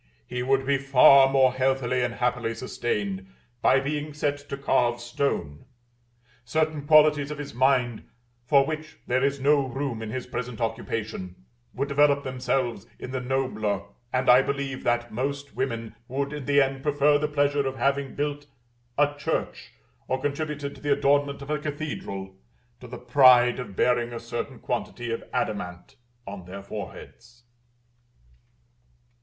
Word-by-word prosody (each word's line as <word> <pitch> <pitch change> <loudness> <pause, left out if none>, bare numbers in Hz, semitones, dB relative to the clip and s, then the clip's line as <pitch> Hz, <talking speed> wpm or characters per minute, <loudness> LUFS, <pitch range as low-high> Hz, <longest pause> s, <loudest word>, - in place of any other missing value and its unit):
He 125 - -4
would 135 +1 +1
be 140 0 +2
far 140 0 +7
more 135 -2 +4
healthily 130 -1 +1
and 120 -1 -1
happily 125 -2 -1
sustained 100 -6 -3 0.3
by 130 - +5
being 150 +2 -3
set 145 -1 -1
to 140 - -4
carve 120 -3 +1
stone; 120 - -3 0.8
certain 155 +2 -1
qualities 150 -2 +5
of 150 - -5
his 145 -1 -7
mind, 125 -2 +1 0.3
for 135 +2 +4
which 155 +1 -5
there 130 +2 +1
is 140 0 +1
no 140 0 +3
room 130 -3 -3
in 110 - -5
his 125 +3 -4
present 125 -2 -5
occupation, 105 -5 -4 0.3
would 140 +2 -1
develope 140 0 +3
themselves 125 -4 -2
in 125 - -7
the 130 - -2
nobler; 125 -6 -1 0.3
and 130 0 0
I 125 +1 +8
believe 140 -1 -3
that 120 0 0
most 140 +4 -3
women 115 -4 -3
would, 140 +2 -2
in 145 -3 -6
the 145 0 +4
end, 135 0 -3
prefer 145 0 +3
the 150 - 0
pleasure 145 -1 +1
of 135 - -3
having 140 +1 0
built 145 0 -3 0.5
a 145 0 +3
church, 140 - -3 0.3
or 130 - -1
contributed 145 0 -3
to - - -15
the 145 -1 +2
adornment 140 0 +1
of 140 - -6
a 150 - 0
cathedral, 140 -11 -5 0.4
to 125 - -11
the 125 +1 -8
pride 125 -1 +5
of 105 -6 -7
bearing 120 +1 +1
a 115 - -4
certain 115 0 -5
quantity 120 -1 -4
of 115 - -3
adamant 105 -1 -3 0.3
on 100 -2 -8
their 95 +2 -8
foreheads. 115 +4 -9
130 Hz, 155 wpm, -26 LUFS, 120-140 Hz, 0.8 s, I